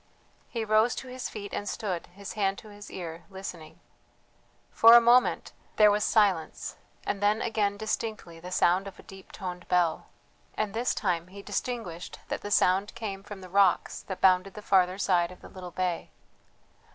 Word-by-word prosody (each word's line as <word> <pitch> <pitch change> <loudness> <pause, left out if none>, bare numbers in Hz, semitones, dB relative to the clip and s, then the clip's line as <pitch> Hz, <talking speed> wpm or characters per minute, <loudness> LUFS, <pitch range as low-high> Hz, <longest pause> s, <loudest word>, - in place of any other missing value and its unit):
He 230 -2 -3
rose 215 +2 +3
to 260 - -7
his 255 0 -5
feet 205 -2 -8
and 205 - -3
stood, 185 -6 -3
his 195 +2 -9
hand 195 -2 0
to 215 - -11
his 205 0 -11
ear, 170 -2 -7
listening. 190 -5 -9 0.9
For 230 +1 +8
a - - +11
moment 240 +2 +3 0.2
there 210 -1 +6
was 210 +1 +1
silence, 195 -7 +1 0.3
and 200 - -2
then 205 +2 +3
again 205 -3 0
distinctly 215 -5 -4
the 180 +2 -8
sound 185 +2 +2
of 195 - -10
a - - -14
deep 195 -1 -13
toned 180 -2 -7
bell 175 -3 +1 0.5
and 215 -1 -1
this 235 +3 0
time 175 -4 -1
he 200 +2 -11
distinguished 210 -11 -4
that - - -3
the 205 - -6
sound 195 +1 +2
came 205 -4 -5
from 200 0 -10
the 185 - -9
rocks 195 -1 +2
that 190 - -7
bounded 185 +1 +4
the 210 - -9
farther 185 -2 +3
side 180 -3 +2
of 180 - -14
the - - -12
little 185 -2 -9
bay. 180 -1 -2
195 Hz, 180 wpm, -28 LUFS, 180-215 Hz, 0.9 s, a